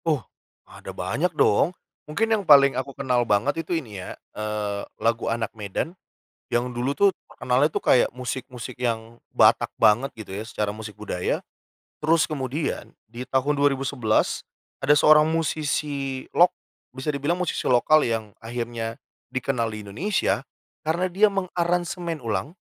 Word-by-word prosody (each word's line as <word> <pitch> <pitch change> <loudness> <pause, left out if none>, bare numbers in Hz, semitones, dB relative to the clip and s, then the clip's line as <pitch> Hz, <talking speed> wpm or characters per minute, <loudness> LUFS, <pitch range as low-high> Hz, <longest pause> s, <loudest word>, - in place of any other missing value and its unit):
Oh, 150 - +1 0.4
ada - - -12
banyak - - -1
dong. 165 - +3 0.3
Mungkin 225 +8 +1
yang 215 - +2
paling 140 -6 +7
aku 130 +1 -4
kenal 130 -3 +1
banget 120 +8 +1
itu 165 +2 -2
ini 110 - -6
ya, - - -8 0.2
eee, 105 -1 -3 0.2
lagu 115 +1 0
Anak 115 -1 -2
Medan 105 - -4 0.6
yang 120 +1 0
dulu 125 +4 -2
tuh 200 -1 +5 0.2
terkenalnya 125 +4 +1
tuh - - -4
kayak 125 - +5
musik-musik 125 -1 -6
yang 115 -1 -2 0.2
Batak - - +5
banget 115 +6 +4
gitu 110 -4 -9
ya, 105 +3 -4
secara 105 -3 -2
musik 105 -2 -8
budaya. 90 -4 -2 0.5
Terus 160 +1 +2
kemudian, 145 +1 -3 0.2
di 120 +2 -7
tahun 135 +3 +1
2011, 135 -5 +1 0.3
ada 140 +2 +3
seorang 150 +1 +6
musisi 145 -4 -1
lok 175 +1 +6 0.4
bisa 130 +3 -4
dibilang 150 +5 0
musisi 180 - -2
lokal 150 +5 +4
yang 115 -2 -2
akhirnya 115 -1 -4 0.4
dikenal 130 -2 0
di 105 - -6
Indonesia, 175 - 0 0.4
karena 170 +4 +1
dia 200 +3 +3
mengaransemen 175 -3 -1
ulang 115 +7 -2
130 Hz, 145 wpm, -24 LUFS, 115-155 Hz, 0.6 s, paling